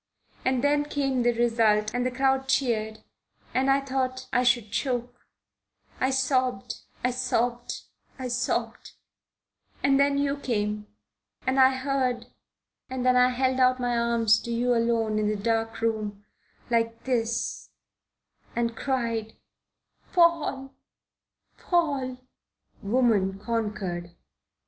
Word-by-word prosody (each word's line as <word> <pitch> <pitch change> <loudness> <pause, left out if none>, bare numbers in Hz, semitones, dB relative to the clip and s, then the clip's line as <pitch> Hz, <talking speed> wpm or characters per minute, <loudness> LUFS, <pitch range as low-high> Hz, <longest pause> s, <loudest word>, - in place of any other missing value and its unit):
And 260 -1 +1
then 290 0 +3
came 275 -3 0
the 240 0 +3
result 225 -3 +2
and 245 0 0
the 255 - +1
crowd 265 +1 +1
cheered 220 -5 0 0.5
and 265 +1 +2
I 275 +1 +4
thought 260 -1 -2
I 250 - +4
should 240 -4 +2
choke. 245 -2 -3 0.7
I 260 - +2
sobbed, 260 -4 0 0.3
I 250 - +2
sobbed, 245 -1 -1 0.3
I 260 -2 -4
sobbed 245 +1 -2 0.9
and 275 0 +4
then 280 0 +3
you 280 0 0
came. 210 -5 -2 0.6
And 260 +1 +1
I 260 0 +6
heard, 260 -2 -1 0.6
and 260 -1 -3
then 255 0 +4
I 250 0 +5
held 260 +1 0
out 255 0 +4
my 245 -1 0
arms 235 -2 +3
to 235 - -6
you 245 +1 +1
alone 230 -2 +1
in 210 - +1
the 210 - 0
dark 225 +2 -1
room 215 -2 -2 0.5
like 230 0 0
this 235 -2 -1 0.9
and 235 -1 0
cried: 230 -5 -2 0.8
'Paul, 310 -6 +2 0.9
Paul!"' 280 -8 0 0.6
Woman 205 -4 +2
conquered. 205 -5 -3
245 Hz, 120 wpm, -26 LUFS, 225-260 Hz, 0.9 s, I